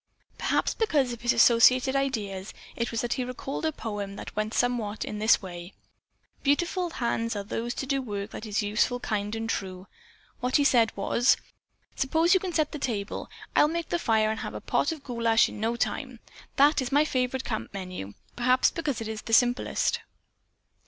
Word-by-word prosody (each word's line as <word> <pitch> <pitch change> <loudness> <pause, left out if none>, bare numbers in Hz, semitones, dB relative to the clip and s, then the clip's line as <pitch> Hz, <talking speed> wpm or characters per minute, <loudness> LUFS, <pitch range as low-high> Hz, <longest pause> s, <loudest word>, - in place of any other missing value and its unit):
Perhaps - - +1
because 290 - +1
of 235 -1 -10
associated 250 +2 +5
ideas 210 -8 -2 0.2
it 235 - -1
was 230 - -2
that 240 - -1
he 255 - -2
recalled 260 +5 -4
a - - 0
poem 205 -7 -5
that - - -8
went 215 0 -1
somewhat 235 -4 0
in 210 - -5
this 215 -1 +4
way: 175 0 -8 0.7
"Beautiful 345 +5 +1
hands 230 -5 -1
are 200 - -3
those 230 +4 -3
that - - -3
do 275 0 0
work 205 -4 -5
that 220 - -7
is 210 0 0
useful, 215 +4 +1
kind 210 -2 -2
and 225 0 -3
true." 185 -4 -4 0.5
What 250 +1 -1
he 290 - +5
said 235 -5 +4
was: 235 +5 +3 0.6
"Suppose 325 +6 +2
you 380 - +5
set 310 -3 +1
the 300 - -6
table. 210 -7 -3 0.3
I'll - - +6
make 335 +1 -3
the 345 - 0
fire 220 -5 +2
and 220 - -4
have - - -5
a - - -4
pot - - 0
of 310 -4 -7
goulash 230 -2 +3
in - - -9
no 225 +2 0
time. 255 0 -3 0.4
That 285 +1 +5
is 260 +1 -4
my 290 +2 +4
favorite 255 -2 -1
camp 220 -2 -4
menu, 185 - -7 0.2
perhaps 255 +1 +3
because 295 -8 -3
it 225 - -4
is 220 -1 -5
the 225 - -5
simplest." 245 +2 +2
235 Hz, 185 wpm, -27 LUFS, 215-270 Hz, 0.7 s, I'll